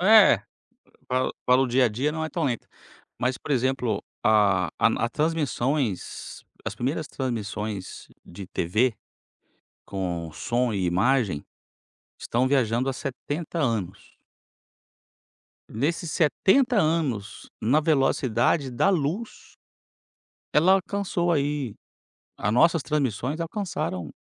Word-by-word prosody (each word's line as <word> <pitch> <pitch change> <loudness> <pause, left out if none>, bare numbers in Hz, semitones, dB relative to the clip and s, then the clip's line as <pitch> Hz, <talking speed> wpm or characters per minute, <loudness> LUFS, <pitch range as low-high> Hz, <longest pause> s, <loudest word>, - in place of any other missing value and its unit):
É, 215 +2 +7 0.7
pra 130 0 0 0.2
para 125 +1 +5
o 135 - +2
dia 125 +1 +3
a - - +4
dia 130 +8 -1
não 160 +1 -3
é - - -3
tão 165 +2 -3
lenta, 125 -4 -2 0.5
mas, 125 0 0
por 145 - -4
exemplo, 125 -4 0 0.2
a 100 -5 +4
a - - +4
na - - 0
a - - 0
transmissões 140 - -2 0.2
as - - -3
primeiras 145 +5 -2
transmissões 105 -6 -4 0.2
de 95 +1 -9
TV, 110 +8 +1 0.9
com 85 -4 -4
som 120 +1 0
e 95 -3 0
imagem, 95 - +1 0.7
estão 125 +3 0
viajando 130 -1 +1
há - - -2
70 145 +6 -5
anos. 110 - -2 1.5
Nesses 155 +7 -2
70 235 - +3
anos, 155 - 0
na 130 +8 +3
velocidade 135 -3 +2
da 120 +10 +2
luz, 185 +6 -2 1.0
ela 170 +5 +5
alcançou 190 -2 0
aí 145 -6 0 0.6
a 105 - 0
nossas 165 +5 +4
transmissões 140 0 -1
alcançaram 160 - -3
130 Hz, 115 wpm, -25 LUFS, 110-155 Hz, 1.5 s, É